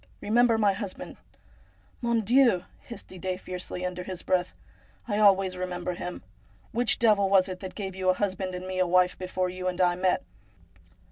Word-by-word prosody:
Eemember 235 +1 +3
my 205 -3 +3
husband! 195 -1 -7 0.3
' - - -30
' - - -34
Mon 235 -2 +1
Dieu! 235 -4 +4
' - - -30
hissed 235 - -8
Didet 185 0 -4
fiercely, 180 0 -5
under 180 0 -4
his 180 -1 -6
breath, 180 -1 +1 0.3
' - - -32
I 210 -2 0
always 195 -3 +4
remember 180 0 -3
him. 180 - -6 0.5
Which 240 0 +1
devil 210 -4 +3
was 190 -1 +5
it 185 -1 -6
that 190 -1 -8
gave 190 -3 -5
you 185 -1 0
a 185 - +4
husband 190 -2 -2
and 180 0 -6
me 185 0 -3
a 185 - +3
wife 180 +1 +3
before 185 0 -2
you 185 0 -5
and 180 0 -2
I 180 -1 +4
met 180 +1 +1
185 Hz, 200 wpm, -27 LUFS, 180-205 Hz, 0.5 s, was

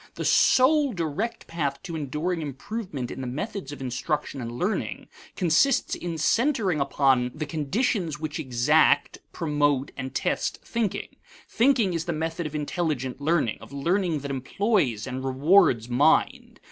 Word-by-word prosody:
The - - -4
sole 280 +1 +4
direct 190 +7 -3
path 145 -5 -3
to 170 -3 -6
enduring 160 +4 -2
improvement 150 - -5
in - - -6
the 130 - -4
methods 155 - -5
of 145 - -8
instruction 135 +2 -3
and 115 -1 -5
learning 180 - -3 0.3
consists 185 - +2
in 170 -2 -4
centering 215 - +1
upon 135 -3 +2
the 155 0 -3
conditions 165 - -1
which 155 0 -4
exact, 145 +2 +2
promote, 145 -4 0
and 130 -1 -5
test - - -1
thinking. 230 -5 -2 0.4
Thinking 235 -6 +2
is 165 0 -2
the 175 - -1
method 160 +1 -3
of 155 - -8
intelligent 145 -4 -2
learning, 150 -7 +1
of - - -12
learning 170 +2 0
that 140 0 -5
employs 135 - 0
and 130 0 -5
rewards 135 - +3
mind. 140 +6 +2
155 Hz, 145 wpm, -26 LUFS, 135-185 Hz, 0.4 s, sole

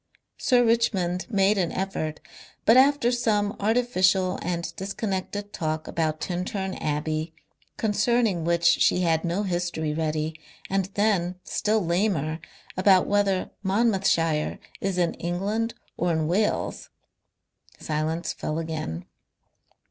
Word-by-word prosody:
Sir 245 -2 +4
Richmond 190 -6 +1
made 200 -1 +3
an 175 -3 0
effort, 185 -5 -3 0.5
but 225 - +6
after 265 -2 +5
some 215 -4 +1
artificial 195 -4 +2
and 170 -1 -3
disconnected 200 +1 -4
talk 155 -1 -2
about 155 -2 -1
Tintern 190 +2 -3
Abbey, 155 +2 -2 0.4
concerning, 215 -3 +1
which 170 +1 +1
she 170 +1 +4
had 165 -2 +2
no 175 +4 -1
history 175 -4 -2
ready, 155 0 -1 0.4
and 195 -1 +1
then, 195 -4 +1
still 215 -2 0
lamer, 170 -3 0 0.4
about 185 -1 +5
whether 200 -2 +1
Monmouthshire 190 -7 +1 0.2
is 195 -1 -2
in 175 -2 +1
England 205 +7 -1 0.2
or 165 -3 +1
Wales, 195 +7 -1 0.9
silence 160 +2 -2
fell 155 - -3
again. 155 - -4
185 Hz, 110 wpm, -25 LUFS, 165-205 Hz, 0.9 s, but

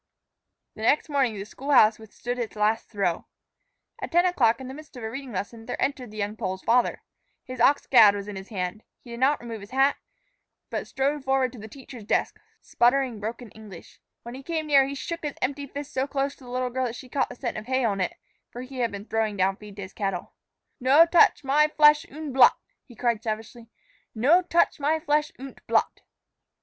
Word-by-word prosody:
The - - -11
next 285 +8 +2
morning 270 -6 +1
the 195 - -5
school 270 +6 -9
house 225 -6 +5
withstood 245 +3 -6
its 230 -2 -4
last 215 +2 0
throe. 195 -6 -2 0.7
At - - -5
ten 345 +2 +4
o'clock, 240 -11 +2
in 260 - -8
the 260 - -7
midst 300 -2 -12
of 245 - -8
a 220 - -4
reading 270 0 -7
lesson, 225 +3 -6
there 245 - -4
entered 265 -4 -2
the 215 - -12
young 205 0 -3
Pole's 190 -4 -4
father. 245 +1 +1 0.4
His 255 -1 -7
ox 280 +4 +4
gad 215 -6 +7
was 200 0 -6
in 205 - -6
his 190 0 -8
hand; 185 0 -4 0.2
he 240 - -12
did 235 - -7
not 280 +3 +3
remove 230 -3 -7
his 200 - -11
hat, 270 +2 +2 0.7
but - - -3
strode 280 +1 -1
forward 265 -1 +1
to 245 - -11
the 215 - -9
teacher's 250 -1 -11
desk, - - -1 0.2
sputtering 245 -2 +1
broken 225 +1 -6
English. 210 -5 -13 0.2
When 235 - -8
he 265 - -8
came 315 +2 -3
near, 275 -3 +4
he 280 - -5
shook 335 +5 -5
his 295 -2 -4
empty 280 +2 -2
fist 285 +1 -8
so 265 +1 0
close 275 0 -2
to 260 - -16
the - - -11
little 250 0 -2
girl 260 +1 -1
that 235 -1 -4
she 255 - -10
caught 265 +2 -1
the - - -9
scent 245 -1 -4
of 215 - -12
hay 260 -1 +1
on 200 -3 0
it, 180 - -2 0.3
for 245 - -8
he 260 0 -9
had 235 -2 0
been 200 0 -7
throwing 220 -2 -1
down 190 +1 +2
feed 210 -2 -12
to 200 - -7
his 190 - -10
cattle. 195 -3 -4 0.5
"No 275 +6 +6
touch 350 +2 +4
my 290 +3 +3
flesh 300 0 +4
unt 300 -1 -7
blut," 265 - +7 0.3
he 240 - -16
cried 235 -1 0
savagely; 225 +1 -6 0.5
"no 285 +11 +4
touch 340 -3 +1
my 305 +3 +1
flesh 300 0 0
unt 270 +1 -10
blut." - - +1
250 Hz, 220 wpm, -25 LUFS, 220-280 Hz, 0.7 s, gad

